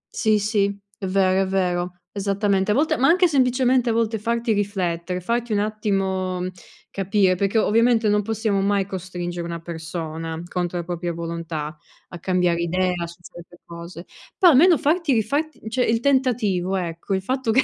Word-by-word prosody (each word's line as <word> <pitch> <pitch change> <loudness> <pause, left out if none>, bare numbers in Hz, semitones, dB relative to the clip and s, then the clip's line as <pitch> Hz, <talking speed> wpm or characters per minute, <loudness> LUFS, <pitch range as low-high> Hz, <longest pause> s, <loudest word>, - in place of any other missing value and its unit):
Sì, 215 -2 +3
sì, 205 -1 +1 0.3
è 190 - -3
vero, 190 0 +2
è 190 - 0
vero, 180 -2 -1 0.2
esattamente. 200 0 0
A 210 - +3
volte 300 -1 +2
ma 265 - +3
anche 360 +2 +5
semplicemente, 255 -3 +2
a - - +2
volte, 225 -1 0
farti 235 +1 -1
riflettere, 180 -3 -2
farti 235 +3 -1
un - - +2
attimo 195 -3 -1 0.5
capire, 195 -1 +2
perché 200 +4 0
ovviamente 225 +1 +3
non 210 0 +3
possiamo 215 -2 -1
mai 200 -1 +1
costringere 175 -2 -5
una 170 0 -5
persona 165 -1 -5
contro 175 0 -2
la 170 - -2
propria 175 0 -4
volontà, 165 -2 -5 0.3
a 175 - -9
cambiare 180 -1 +1
idea 180 +2 0
su 170 - -11
certe 175 +1 -13
cose. 170 +1 -9 0.3
Però 360 -5 +7
almeno 325 +4 +6
farti 310 +1 +1
rifarti 280 +4 -1
cioè 250 +3 0
il 225 0 +1
tentativo, 230 -9 +1
ecco, 175 +1 -3
il 190 - -2
fatto 260 +1 -2
che 260 +4 +4
195 Hz, 165 wpm, -22 LUFS, 175-230 Hz, 0.5 s, Però